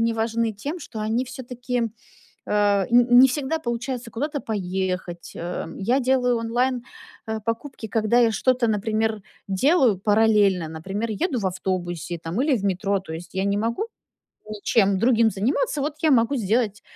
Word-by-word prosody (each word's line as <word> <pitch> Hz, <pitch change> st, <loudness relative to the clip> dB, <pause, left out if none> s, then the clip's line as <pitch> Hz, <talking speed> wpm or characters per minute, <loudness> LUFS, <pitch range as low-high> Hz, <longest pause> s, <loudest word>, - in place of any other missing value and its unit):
мне 230 Hz, 0 st, +1 dB
важны 225 Hz, 0 st, 0 dB
тем, 285 Hz, -, -5 dB
что 220 Hz, -, -7 dB
они, 225 Hz, +4 st, 0 dB
всё-таки, 245 Hz, -2 st, -4 dB, 0.6 s
э, -, -, -8 dB, 0.4 s
н 245 Hz, 0 st, +6 dB
не 265 Hz, +1 st, +8 dB
всегда 295 Hz, +4 st, -1 dB
получается 240 Hz, -1 st, -4 dB
куда-то 290 Hz, +4 st, -3 dB
поехать, 185 Hz, -4 st, -3 dB
э, 175 Hz, -1 st, -4 dB
я 240 Hz, +8 st, +1 dB
делаю 250 Hz, -1 st, +2 dB
онлайн, 240 Hz, +2 st, 0 dB, 0.5 s
э, 220 Hz, 0 st, -2 dB
покупки, 230 Hz, 0 st, -4 dB
когда 220 Hz, +3 st, +2 dB
я 230 Hz, -2 st, +4 dB
что-то, 255 Hz, 0 st, +2 dB
например, 215 Hz, 0 st, 0 dB, 0.3 s
делаю 245 Hz, -, +3 dB
параллельно. 205 Hz, -5 st, +3 dB
Например, 195 Hz, +8 st, -4 dB
еду 255 Hz, -, -1 dB
в 195 Hz, -, -1 dB
автобусе, 175 Hz, -2 st, -3 dB
там, 170 Hz, +10 st, -2 dB
или 285 Hz, -4 st, +2 dB
в 200 Hz, -, -5 dB
метро. 195 Hz, +1 st, 0 dB
То 170 Hz, -4 st, -9 dB
есть, 170 Hz, +2 st, -9 dB
я 190 Hz, +1 st, 0 dB
не 200 Hz, 0 st, +1 dB
могу 230 Hz, -, -1 dB, 0.6 s
ничем 200 Hz, -2 st, +2 dB
другим 230 Hz, 0 st, +4 dB
заниматься, 265 Hz, -, 0 dB
вот, 295 Hz, +1 st, -2 dB
я 315 Hz, -, +4 dB
могу 240 Hz, +3 st, +3 dB
сделать 215 Hz, -1 st, 0 dB
225 Hz, 160 wpm, -24 LUFS, 195-250 Hz, 0.6 s, не